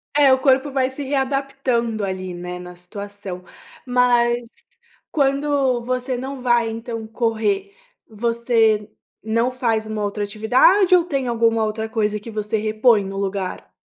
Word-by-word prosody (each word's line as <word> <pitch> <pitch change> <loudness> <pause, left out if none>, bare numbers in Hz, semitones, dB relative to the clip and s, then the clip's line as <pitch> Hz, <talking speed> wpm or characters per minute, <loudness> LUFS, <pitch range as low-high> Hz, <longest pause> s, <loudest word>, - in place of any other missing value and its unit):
É, 285 -2 +6
o 260 - +2
corpo 265 +1 +3
vai 260 -1 +1
se 265 +2 -6
readaptando 265 -5 -1
ali, 185 -1 -4
né, 180 0 -6
na 180 0 -10
situação. 200 0 -8 0.4
Mas 245 -1 +2 0.6
quando 275 -3 +1
você 255 +1 -2
não 265 +1 -6
vai, 240 -2 +2
então, 225 0 -6
correr, 220 -4 -1 0.3
você 225 -1 +1 0.3
não 230 +3 +1
faz 230 -4 0
uma 215 -1 -3
outra 205 0 -2
atividade 255 - +4
ou 355 - +4
tem 275 -6 -2
alguma 230 -1 +2
outra 220 +1 -2
coisa 210 -1 0
que 225 +2 -9
você 215 +1 -2
repõe 215 0 +3
no 195 0 -6
lugar? 195 -1 -4
230 Hz, 145 wpm, -21 LUFS, 210-255 Hz, 0.6 s, É